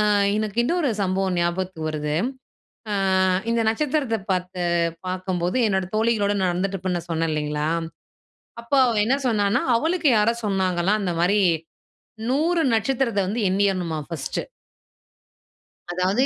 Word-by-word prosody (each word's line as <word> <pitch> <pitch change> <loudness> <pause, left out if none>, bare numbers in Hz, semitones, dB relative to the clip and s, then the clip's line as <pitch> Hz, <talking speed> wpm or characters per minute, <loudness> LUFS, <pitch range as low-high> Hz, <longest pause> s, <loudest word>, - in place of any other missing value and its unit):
ஆ - - +4 0.3
இன்னொரு 240 - 0
சம்பவம் 190 -1 0
ஞாபகத்துக்கு 175 -1 -2
வருது. 150 -1 -2 0.8
ஆ - - 0 0.6
இந்த 230 0 +2
நட்சத்திரத்தை 270 -1 0
பார்த்து 180 0 -2 0.5
பார்க்கும்போது 185 +1 -2
என்னோட 190 -2 0
தோழிகளோட 215 -2 +2
நடந்துட்டு 185 +2 -1
இருப்பேன்னு 175 -2 -3
சொன்னேன் 165 0 0
இல்லைங்களா, 150 0 -1 1.0
அப்ப 235 - -22
அவ 235 -2 0
என்ன 260 +4 +3
சொன்னான்னா, 205 -3 +2
அவளுக்கு 320 +4 +1
யாரோ 215 +2 +3
சொன்னாங்களாம் 190 +1 +1
அந்த 180 -3 -1
மாதிரி, 200 +4 +3 0.9
100 325 +5 +2
நட்சத்திரத்தை 235 -2 0
வந்து 220 +4 -1
எண்ணியரணுமா 185 -4 0
ஃபர்ஸ்ட் 165 -5 -3 1.5
அதாவது, 185 +7 +1
195 Hz, 115 wpm, -23 LUFS, 180-230 Hz, 1.5 s, ஆ